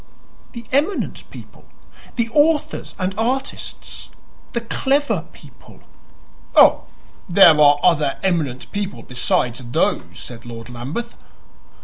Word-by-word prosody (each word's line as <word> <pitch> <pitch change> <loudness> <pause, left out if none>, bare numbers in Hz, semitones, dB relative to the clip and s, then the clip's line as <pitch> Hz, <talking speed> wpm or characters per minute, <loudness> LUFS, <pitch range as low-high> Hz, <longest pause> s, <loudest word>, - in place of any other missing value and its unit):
"The 235 -1 -8
eminent 295 +9 -1
people - - -13 0.5
the 235 -2 0
authors 300 +1 +1
and 185 +1 -2
artists 260 +4 -3 0.4
the 235 - -1
clever 275 +5 0
people." - - -17 0.7
"Oh, - - +6 0.4
there 170 -4 +7
are 145 -1 +7
other 150 -6 +2
eminent 155 -9 -1
people 200 -1 -4
besides 125 0 -1
those," 120 0 0 0.2
said 120 -2 -9
Lord 115 0 -9
Lambeth. 140 - -5
185 Hz, 105 wpm, -20 LUFS, -, 0.7 s, there